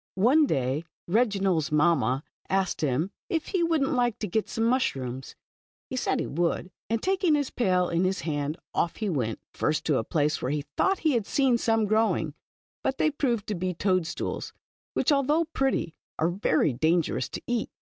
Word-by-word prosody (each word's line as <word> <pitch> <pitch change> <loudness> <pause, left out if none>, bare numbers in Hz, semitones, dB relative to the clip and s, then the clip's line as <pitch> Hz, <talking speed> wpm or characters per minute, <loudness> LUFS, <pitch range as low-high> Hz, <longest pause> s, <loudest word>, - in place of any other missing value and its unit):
o - - -2
XE 285 +7 +5
day 135 - 0 0.2
Reginald's 195 - +1
mamma 150 -4 +2 0.3
asked 190 -1 0
him 150 +6 0 0.2
if 325 -2 -1
he 375 - 0
would 330 -3 +2
n't 270 - 0
like 245 -3 +1
to 215 - -3
get 215 +4 -1
some 225 - -1
mushrooms= 135 - -1 0.6
He - - -2
said - - 0
he - - -1
would, 175 +3 -1 0.2
and 230 0 0
taking 375 -4 +2
his 285 -2 -1
pail 185 -6 +2
in 170 +1 +1
his 190 +1 0
hand, 150 -1 -2 0.2
off 170 - 0
he 215 -2 -2
went. 125 -9 -1 0.2
First 155 - 0
to 150 -4 +2
a - - -1
place 150 +4 0
where 125 - -1
he 145 0 -2
thought 385 0 +2
he 310 - +5
had 230 -6 0
seen 260 -4 +2
some 225 -1 +2
growing, 220 +2 +1 0.5
but 265 - 0
they 310 - +2
proved 240 -7 0
to - - 0
be 185 -1 -2
toad 185 -2 +1
stools, - - -4 0.4
which, - - +2
although 295 +4 +3
pretty, 270 - -1 0.2
are 160 - +2
very 160 -5 +1
dan 160 +7 +3
gerous - - -3
to - - -4
eat. 240 -2 -1
190 Hz, 195 wpm, -27 LUFS, 155-250 Hz, 0.6 s, XE